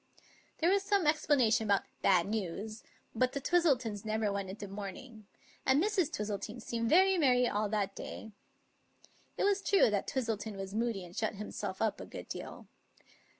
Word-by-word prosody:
There 335 Hz, +3 st, +3 dB
was 400 Hz, 0 st, +3 dB
some 395 Hz, -3 st, +1 dB
explanation 280 Hz, -8 st, +3 dB
about 200 Hz, -1 st, +3 dB
" -, -, -40 dB
bad 180 Hz, -3 st, +4 dB
news," 215 Hz, +1 st, -4 dB, 0.3 s
but 255 Hz, +3 st, +1 dB
the 280 Hz, -, -2 dB
Twistletons 260 Hz, -, +1 dB
never 215 Hz, -1 st, 0 dB
went 200 Hz, -1 st, -3 dB
into 205 Hz, +1 st, -7 dB
mourning; 205 Hz, +3 st, -8 dB, 0.4 s
and 265 Hz, +2 st, +4 dB
Mrs. 375 Hz, -3 st, +1 dB
J'wistle 210 Hz, -7 st, -3 dB
ton 220 Hz, +3 st, -6 dB
seemed 230 Hz, 0 st, -2 dB
very 375 Hz, +3 st, +5 dB
merry 250 Hz, -4 st, +4 dB
all 210 Hz, -1 st, 0 dB
that 200 Hz, -2 st, -1 dB
day. 220 Hz, -, -7 dB, 1.1 s
It -, -, 0 dB
was 400 Hz, -1 st, +2 dB
true 390 Hz, -, +4 dB
that 200 Hz, -2 st, -1 dB
Twistleton 225 Hz, -5 st, -2 dB
was 195 Hz, 0 st, -6 dB
moody 220 Hz, -4 st, -1 dB
and 175 Hz, +1 st, -13 dB
shut 220 Hz, -1 st, -1 dB
himself 200 Hz, -1 st, -4 dB
up 220 Hz, -, -1 dB
a -, -, -8 dB
good -, -, -8 dB
deal. -, -, -7 dB
220 Hz, 175 wpm, -32 LUFS, 205-280 Hz, 1.1 s, very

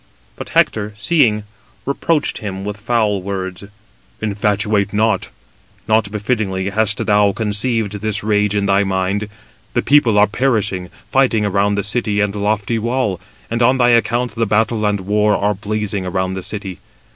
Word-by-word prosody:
But -, -, -8 dB
Hector, 105 Hz, -1 st, +1 dB
seeing, 110 Hz, -3 st, +2 dB, 0.4 s
reproached 145 Hz, +3 st, 0 dB
him 95 Hz, -2 st, -5 dB
with 105 Hz, 0 st, -4 dB
foul 110 Hz, -2 st, 0 dB
words: 95 Hz, 0 st, -5 dB, 0.5 s
"Infatuate; 105 Hz, -1 st, 0 dB
not 110 Hz, -2 st, +1 dB, 0.6 s
befittingly 105 Hz, -2 st, 0 dB
hast 105 Hz, 0 st, +1 dB
thou 105 Hz, -1 st, +3 dB
conceived 105 Hz, -1 st, -1 dB
this 105 Hz, -1 st, -1 dB
rage 105 Hz, -1 st, +1 dB
in 100 Hz, -1 st, +1 dB
thy 100 Hz, 0 st, +3 dB
mind: 95 Hz, +2 st, -1 dB, 0.5 s
the -, -, +1 dB
people 130 Hz, -7 st, +4 dB
are 105 Hz, -, +7 dB
perishing, 105 Hz, -6 st, -1 dB, 0.2 s
fighting 125 Hz, -5 st, +2 dB
around 100 Hz, 0 st, +1 dB
the 100 Hz, -, -1 dB
city 105 Hz, 0 st, -1 dB
and 105 Hz, -1 st, +1 dB
the 105 Hz, -, -5 dB
lofty 105 Hz, +2 st, 0 dB
wall: 110 Hz, -6 st, -1 dB, 0.3 s
and 115 Hz, +1 st, -1 dB
on 125 Hz, +3 st, +4 dB
thy 120 Hz, -1 st, +4 dB
account 120 Hz, 0 st, +2 dB
the 115 Hz, 0 st, -1 dB
battle 110 Hz, +1 st, +1 dB
and 105 Hz, -1 st, 0 dB
war 105 Hz, +2 st, +2 dB
are 105 Hz, +1 st, +1 dB
blazing 105 Hz, -1 st, -3 dB
around 95 Hz, +1 st, -1 dB
the 95 Hz, -, -4 dB
city. 95 Hz, -1 st, -5 dB
105 Hz, 155 wpm, -18 LUFS, 100-110 Hz, 0.6 s, are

